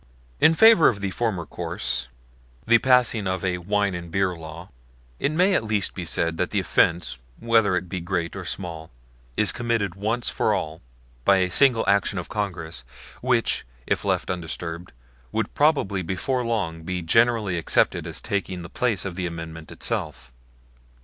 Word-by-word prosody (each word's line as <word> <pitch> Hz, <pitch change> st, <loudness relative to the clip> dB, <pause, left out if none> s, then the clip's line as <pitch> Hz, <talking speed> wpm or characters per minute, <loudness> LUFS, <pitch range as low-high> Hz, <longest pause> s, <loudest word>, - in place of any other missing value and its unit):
In 160 Hz, -, +5 dB
favor 220 Hz, -5 st, +7 dB
of 105 Hz, -, +1 dB
the 100 Hz, -1 st, -2 dB
former 100 Hz, -6 st, -2 dB
course 65 Hz, -3 st, -3 dB, 0.6 s
the 115 Hz, +1 st, +5 dB
passing 125 Hz, -5 st, +3 dB
of 95 Hz, 0 st, -2 dB
a 90 Hz, -1 st, 0 dB
wine 100 Hz, +2 st, 0 dB
and 85 Hz, -1 st, -6 dB
beer 95 Hz, +1 st, 0 dB
law 80 Hz, +2 st, -10 dB, 0.5 s
it 140 Hz, -, 0 dB
may 180 Hz, +5 st, +3 dB
at 150 Hz, -, +2 dB
least 105 Hz, -3 st, -1 dB
be 90 Hz, -, -5 dB
said 85 Hz, -1 st, 0 dB
that -, -, 0 dB
the -, -, 0 dB
offense, 85 Hz, -7 st, +1 dB, 0.2 s
whether 115 Hz, -4 st, +3 dB
it 90 Hz, 0 st, -2 dB
be 95 Hz, 0 st, -4 dB
great 85 Hz, 0 st, -2 dB
or 100 Hz, -, -5 dB
small, 85 Hz, -3 st, -5 dB, 0.5 s
is 105 Hz, -, +3 dB
committed 115 Hz, -6 st, -1 dB
once 110 Hz, +5 st, -2 dB
for 105 Hz, -, +1 dB
all 80 Hz, -4 st, -4 dB, 0.4 s
by 100 Hz, -, +5 dB
a 90 Hz, -1 st, +1 dB
single 125 Hz, -2 st, +4 dB
action 100 Hz, 0 st, +2 dB
of 90 Hz, -, -5 dB
Congress, 85 Hz, -, -4 dB, 0.4 s
which, 125 Hz, -2 st, +1 dB, 0.2 s
if -, -, -1 dB
left -, -, 0 dB
undisturbed, 85 Hz, 0 st, -5 dB, 0.4 s
would -, -, -2 dB
probably 140 Hz, -11 st, +2 dB
before 110 Hz, +9 st, -1 dB
long 100 Hz, -9 st, -2 dB
be 90 Hz, +1 st, -4 dB
generally 115 Hz, +1 st, +3 dB
accepted 80 Hz, -, +2 dB
as -, -, -2 dB
taking 95 Hz, -3 st, -3 dB
the 85 Hz, -, -9 dB
place 110 Hz, -5 st, -1 dB
of 95 Hz, -, -3 dB
the 90 Hz, 0 st, -3 dB
Amendment 80 Hz, -1 st, -8 dB
itself. -, -, -4 dB
95 Hz, 170 wpm, -24 LUFS, 85-115 Hz, 0.6 s, favor